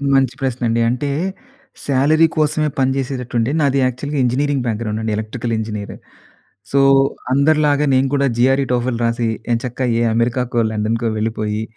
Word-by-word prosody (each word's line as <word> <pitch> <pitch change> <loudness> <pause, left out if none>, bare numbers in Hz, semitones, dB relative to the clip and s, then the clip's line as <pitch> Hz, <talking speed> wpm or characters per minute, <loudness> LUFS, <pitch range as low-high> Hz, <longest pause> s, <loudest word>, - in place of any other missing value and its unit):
మంచి 135 -2 +2
ప్రశ్న 130 -2 -2
అండి. 115 +1 +1
అంటే, 130 +4 -2 0.8
శాలరీ 145 +4 +3
కోసమే 155 0 +1
పని 130 0 +2
చేసేటట్టుంటే, 125 -2 -2
నాది 140 -1 +2
యాక్చువల్‌గా 130 +4 -3
నాది 135 - +2
ఇంజినీరింగ్ 135 +2 0
బ్యాక్‌గ్రౌండ్ 110 -1 -2
అండి. 110 0 -2
Electrical 115 +2 -4
engineer. 105 -2 -5 0.8
సో, 140 - +3 0.5
అందరిలాగా 150 +1 +3
నేను 130 +1 +3
కూడా 140 -1 +2
జీఆర్ఈ, 135 +2 +3
టోఫెల్ 120 -1 -1
రాసి, 115 0 0 0.3
ఎంచక్కా 125 +2 -2
ఏ - - +1
అమెరికాకో, 120 +1 0
లండన్‌‌కో 110 +2 -1
వెళ్ళిపోయి 110 -1 -2
125 Hz, 145 wpm, -18 LUFS, 115-140 Hz, 0.8 s, శాలరీ